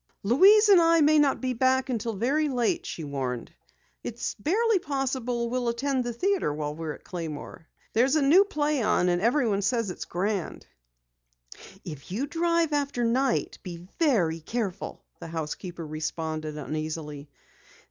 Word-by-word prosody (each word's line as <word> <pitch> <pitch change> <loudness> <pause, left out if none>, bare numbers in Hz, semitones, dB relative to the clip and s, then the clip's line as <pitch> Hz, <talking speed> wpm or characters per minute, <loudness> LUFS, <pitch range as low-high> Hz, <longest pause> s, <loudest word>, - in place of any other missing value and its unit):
"Louise 390 - +6
and 390 -4 +7
I 330 0 +5
may 305 +1 +5
not 285 -2 +2
be 255 -1 -1
back 260 +2 +2
until 230 -3 -2
very 285 +9 +1
late," 285 - 0
she 165 - -5
warned. 130 -4 -4 0.5
"It's 235 0 -4
barely 420 - +2
possible 260 -6 -2
we'll 250 -1 0
attend 260 +2 -1
the 240 - -3
theatre 370 - 0
while 150 0 -3
we're 160 -1 -5
at - - -14
Claymore. 165 -1 -7 0.3
There's 260 +6 +3
a 310 - +3
new 330 +8 +6
play 300 -8 -1
on, 180 -4 +2
and 175 0 +1
everyone 230 -3 +2
says 230 -1 0
it's - - -7
grand." 195 +1 -3 1.2
"If 150 -3 -8
you 230 +9 -1
drive 335 +1 +1
after 280 -4 0
night, 250 +3 0
be 175 -2 -9
very 195 - +2
careful," 200 +2 -4
the - - -8
housekeeper 165 +2 -5
responded 155 0 -4
uneasily. 150 -1 -5
235 Hz, 150 wpm, -27 LUFS, -, 1.2 s, and